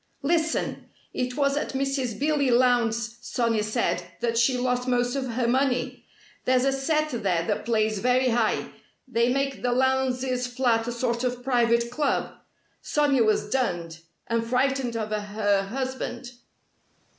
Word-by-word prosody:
Listen! 320 +2 0 0.2
It 250 +1 -3
was 280 -1 +2
at 290 - -2
Mrs. 270 -3 -1
Billy 290 -2 +1
Lowndes', 235 -2 +2
Sonia 230 -3 0
said, 215 +3 0 0.2
that 230 -1 -1
she 235 +2 +3
lost 250 0 -1
most 245 0 +1
of 270 -1 -2
her 240 0 0
money. 255 0 0 0.4
There's 255 0 +3
a 275 - +3
set 305 +3 0
there 190 -8 0
that 210 +1 -2
plays 215 -2 +1
very 250 +3 +2
high. 230 -2 0 0.4
They 235 -1 +1
make 275 0 -1
the 245 - 0
Lowndes' 255 0 +1
flat 245 -2 +1
a - - -1
sort 235 0 -1
of 245 -1 -2
private 235 -2 +2
club. 290 +2 0 0.5
Sonia 285 -5 +2
was 215 -1 +1
dunned 175 -10 -1 0.3
and 230 -1 0
frightened 255 0 0
of 215 -1 -3
her 205 -1 0
husband. 260 -1 -4
245 Hz, 145 wpm, -26 LUFS, 230-265 Hz, 0.5 s, she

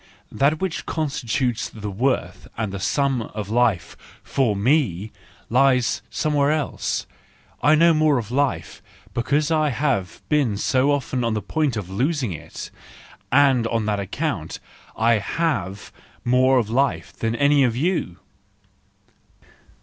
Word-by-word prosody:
That 145 +3 +2
which 190 -4 -3
con¬ 155 -2 -1
stitutes 120 -2 -1
the 105 -2 -6
worth 125 +7 -1
and 110 -3 -2
the 100 - -4
sum 135 +5 +1
of 105 -2 -6
life 115 -7 +1 0.3
for 125 -6 0
me, 110 - +1 0.4
lies 125 0 +2
somewhere 145 -2 +1
else; 155 -2 -2 0.6
I 150 +1 +5
know 165 +2 +5
more 155 -2 +3
of 115 -2 -4
life, 140 +1 -1 0.3
because 145 +6 0
I 155 -1 +2
have 125 -8 -1
been 140 -9 +1
so 130 +6 +2
often 135 -3 -1
on 115 -1 0
the - - 0
point 150 -7 -1
of 100 -4 -4
losing 130 - 0
it; 80 - -9 0.6
and 130 -3 +4
just 115 - -2
on 115 -2 0
that 105 -1 0
account 100 - -3 0.4
I 115 0 +3
have 100 - -2 0.3
more 130 +2 +4
of 115 -4 +1
life 135 +5 0
than 115 0 -2
any 140 +1 +4
of 120 -3 +1
you!" 145 - -1
125 Hz, 140 wpm, -22 LUFS, 110-145 Hz, 0.6 s, I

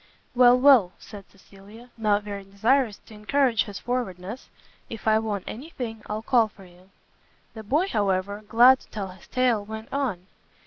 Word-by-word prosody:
"Well, 245 0 +6
well," 250 -9 +5
said 200 -3 -13
Cecilia, 205 +5 -17
not 210 -2 +1
very 200 -1 -7
desirous 220 +4 +1
to - - -15
encourage 235 +3 +1
his 205 -2 -8
forwardness, 230 -3 -5 0.4
"if 225 -1 -8
I 220 0 +4
want 210 -4 -3
any 270 +9 -8
thing, 225 -7 -6
I'll 215 +1 -4
call 235 -2 +3
for 195 -2 -17
you." 180 +1 -20 0.6
The 220 - -8
boy, 295 - 0
however, 200 - -1
glad 245 +4 +6
to - - -20
tell 200 -3 -6
his 185 -1 -15
tale, 250 -5 +1
went 220 +1 -9
on. 240 -11 -2
220 Hz, 170 wpm, -25 LUFS, 200-245 Hz, 0.6 s, Well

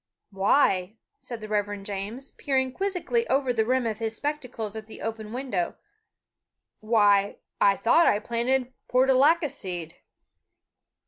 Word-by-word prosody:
"Why," 195 -1 +2 0.2
said 235 -3 -8
the 215 - -6
Reverend 205 -1 -2
James, 205 +7 -5
peering 260 -2 -1
quizzically 395 - -1
over 265 -2 +1
the 220 -2 +1
rim 255 0 +1
of 220 -1 -2
his 225 -1 -2
spectacles 250 -8 -4
at 220 0 -7
the 220 - -11
open 220 -1 -5
window, 240 -8 -2 1.0
"why, 205 -3 +3 0.2
I 200 -1 +5
thought 330 +9 +4
I - - +4
planted 240 +4 -1
portulaca 270 +6 +4
seed." 175 -3 -7
225 Hz, 130 wpm, -26 LUFS, 205-265 Hz, 1.0 s, I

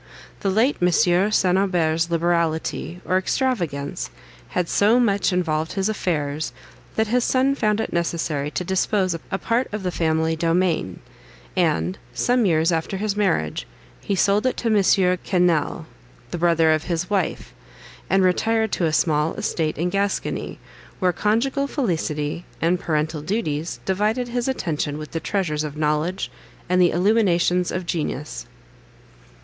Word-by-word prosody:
The 195 - -1
late 225 +7 +2
Monsieur 180 +2 +3
St. 190 -3 +3
Aubert's 170 -4 +1
liberality, 170 0 -1
or 185 +1 +2
extravagance, 175 - -2 0.4
had 180 - -1
so 215 +7 +4
much 200 -6 +2
involved 160 -3 0
his 195 +1 0
affairs, 155 -9 -2 0.4
that 220 - +2
his 245 +1 +2
son 265 +2 +2
found 215 -5 +1
it - - -3
necessary 165 -4 -1
to 180 - -3
dispose 190 0 +1
of 165 - -6
a 190 - -1
part 235 +5 -1
of 210 -1 -4
the 180 - -1
family 160 -1 +1
domain, 165 - 0 0.5
and, 85 +3 +1 0.2
some 245 - +2
years 165 0 +3
after 165 +4 -1
his 205 0 -1
marriage, 170 - 0 0.3
he 200 - -1
sold 205 +5 +2
it 255 - -1
to 230 - 0
Monsieur 190 -3 +3
Quesnel, 175 -4 +1 0.5
the - - -3
brother 165 -2 +4
of 155 0 +1
his 175 0 -2
wife, 195 -4 -2 0.6
and 195 +1 +3
retired 220 +4 +2
to 175 - 0
a 160 - +1
small 155 -1 +1
estate 155 -2 -1
in 175 +3 -1
Gascony, 200 +1 -2 0.4
where 180 -2 +1
conjugal 240 - +1
felicity, 165 - -2 0.2
and 175 +2 +1
parental 155 -1 -1
duties, 160 -3 -2
divided 215 +6 0
his 245 +1 -2
attention 155 - -2
with 155 0 -8
the 165 - -2
treasures 160 -4 -1
of 150 -1 -6
knowledge 155 +5 -1 0.4
and 180 +1 +3
the 175 - +5
illuminations 180 -2 +2
of 185 0 -3
genius. 150 - -3
180 Hz, 150 wpm, -22 LUFS, 160-205 Hz, 0.6 s, the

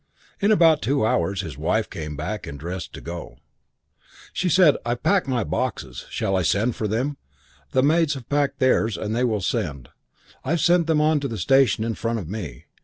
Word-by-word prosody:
"In 205 +1 +3
about 165 -6 +5
two 140 -3 +1
hours 95 -2 +1
his 80 -8 -8
wife - - 0
came 75 -1 -6
back 90 +6 -4
dressed 85 +5 -6
to - - -8
go. 85 0 -7 1.0
She 180 - 0
said, 170 -3 +6
'I've 120 +1 -3
packed 195 -6 +2
my 125 -4 0
boxes. 70 - -3
I - - -19
shall 95 -1 0
send 105 +7 +1
for 110 - -2
them. 130 +7 -1 0.5
The 130 - +2
maids 155 0 +3
have 130 -4 -9
packed 145 -1 0
theirs 115 -4 +2
and 110 +1 -3
they 125 - +1
will 110 -5 0
send. 85 - -2 0.5
I've 165 +5 0
sent 170 0 +3
them 155 -2 +3
on 155 0 +3
to 140 - -3
the 115 -4 -5
station 135 -6 +3
in 115 0 -1
front 115 +1 -2
of 95 -8 -5
me. 95 -5 -7
120 Hz, 195 wpm, -23 LUFS, 95-145 Hz, 1.0 s, said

